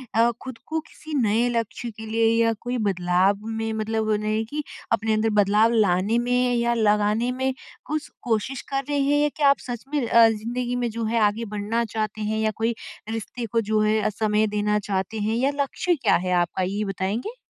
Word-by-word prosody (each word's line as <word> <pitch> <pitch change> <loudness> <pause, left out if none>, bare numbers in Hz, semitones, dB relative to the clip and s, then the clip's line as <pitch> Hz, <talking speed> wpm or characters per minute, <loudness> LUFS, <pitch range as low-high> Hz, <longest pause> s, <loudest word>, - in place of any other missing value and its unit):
अ, 230 +1 +4
खुद 260 -3 -7
को 320 0 -1
किसी 310 0 -11
नए 225 +2 +2
लक्ष्य 230 0 -3
के 220 - -7
लिए 225 +1 +1 0.2
या 230 - +2
कोई 245 +1 -2
बदलाव 180 +1 +2
में 225 0 -2
मतलब 220 0 -1
नहीं 215 +1 0
है 220 - 0
कि 295 +6 -4 0.3
अपने 220 0 +1
अंदर 215 +1 +2
बदलाव 210 +3 +3
लाने 205 +1 +2
में 245 +1 +1
या 235 0 +1
लगाने 210 +2 +2
में 260 +1 -1 0.3
कुछ 305 0 -3
कोशिश 240 +2 -1
कर 275 0 -1
रहे 290 -1 +1
हैं? 290 +2 +3
क्या 285 -2 +4
आप 280 - +4
सच 240 -2 -4
में 275 -5 +1
अ, 230 0 +7
ज़िंदगी 240 +3 -3
में 245 -1 -1
जो 230 +1 -4
है 230 +1 +1
आगे 220 +3 -3
बढ़ना 220 +3 -1
चाहते 215 0 -2
हैं 215 +1 -1
या 220 0 +1
कोई 225 +1 0 0.3
रिश्ते 225 +2 -4
को 230 +1 0
जो 215 -1 +3
है 215 +1 +2
अ, 215 - +1
समय 215 0 +1
देना 210 0 +1
चाहते 195 +3 -2
हैं 215 +2 0
या 270 +3 +2
लक्ष्य 350 +5 -1
क्या 285 - +2
है 180 - -1
आपका 175 +2 -1
ये 205 +2 -1
बताएँगे? 200 - -3
225 Hz, 205 wpm, -24 LUFS, 215-245 Hz, 0.3 s, अ